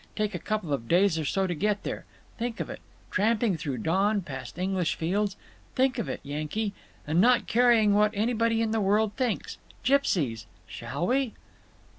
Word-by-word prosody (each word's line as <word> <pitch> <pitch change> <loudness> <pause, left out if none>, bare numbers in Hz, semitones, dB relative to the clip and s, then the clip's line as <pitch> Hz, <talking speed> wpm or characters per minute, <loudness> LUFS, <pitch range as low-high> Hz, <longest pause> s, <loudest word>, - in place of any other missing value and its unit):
Take 210 -1 -1
a 175 - -3
couple 190 -6 -2
of 115 -4 -3
days 175 +1 +3
or 155 - -2
so 190 +7 +1
to 180 - -1
get 205 +5 0
there. - - -5 0.3
Think 235 0 -3
of - - -3
it! - - -7 0.3
Tramping 215 0 +2
through 145 -5 -3
dawn, 195 - +1
past 135 -3 -7
English 185 -2 0
fields. 195 +4 -1 0.4
Think 255 -1 +2
of 230 - -2
it, - - -4
Yankee. 155 +9 -3 0.3
And 160 +4 +2
not 245 +3 +4
caring 230 -3 +4
what 210 +1 +4
anybody 230 +1 +1
in 220 - -1
the 220 -1 +1
world 205 +2 +2
thinks. 250 -4 -2 0.2
Gipsies. 145 - +1 0.2
Shall 135 +8 -4
we?" 255 +1 +1
205 Hz, 175 wpm, -27 LUFS, 165-225 Hz, 0.4 s, not